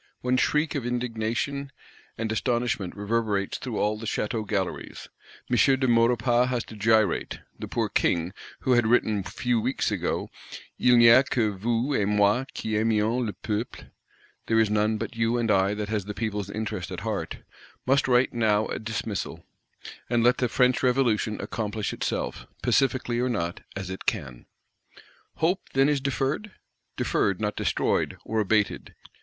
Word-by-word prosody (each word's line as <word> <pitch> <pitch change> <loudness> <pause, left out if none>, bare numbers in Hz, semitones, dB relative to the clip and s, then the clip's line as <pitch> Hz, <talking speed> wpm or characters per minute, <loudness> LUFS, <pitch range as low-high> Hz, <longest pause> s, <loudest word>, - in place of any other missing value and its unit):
One 125 0 +1
shriek 150 +4 +1
of 140 - -2
indignation 125 +3 -2 0.5
and 110 0 -2
astonishment 120 -5 -1
reverberates 105 -1 -1
through 120 -5 -4
all 105 +1 0
the 115 - -6
Château 110 0 -2
galleries; 95 -4 -3 0.4
M. 120 - +1 0.2
de 130 - +1
Maurepas 120 +1 +3
has 120 -2 -1
to 110 - -12
gyrate: 110 0 +2 0.2
the - - -5
poor - - -1
King, 85 +2 0 0.3
who 130 - 0
had 120 -2 +4
written 110 -3 +2
few 115 +5 -1
weeks 130 +4 -1
ago, - - -2 0.5
"Il 125 - +5
n'y 120 - +7
a 120 +3 +8
que 115 -5 0
vous 115 +7 -1
et 105 -6 +1
moi 105 +4 +3
qui 110 - -3
aimions 110 +2 +1
le 110 - -2
peuple 105 +5 -5 0.6
(There 115 0 +3
is 110 -2 +3
none 105 +1 +2
but 115 +1 -5
you 115 +1 +1
and 115 -2 +1
I 95 +1 +3
that 105 0 -4
has 105 -3 -1
the 105 0 -6
people's 105 -3 -3
interest 105 -3 -4
at - - -6
heart)," - - -3 0.5
must 135 +2 +3
write 125 0 +3
now 110 -2 +2
a - - -3
dismissal; 110 -2 -4 0.6
and 120 -1 +2
let 125 +1 +4
the 125 - +1
French 125 +1 +3
Revolution 120 -4 +1
accomplish 105 -2 -3
itself, - - -3 0.2
pacifically 130 -3 +1
or 125 +1 +1
not, 85 -8 -2
as 95 -1 -5
it 95 - -8
can. 60 -2 -3 0.9
Hope, 180 +4 +1
then, 135 +1 +4
is 145 -2 +1
deferred? 140 - -1 0.5
Deferred; 100 -2 +1
not 105 -1 -1
destroyed, - - 0
or 110 - -1
abated. 105 0 0
115 Hz, 160 wpm, -26 LUFS, 105-125 Hz, 0.9 s, a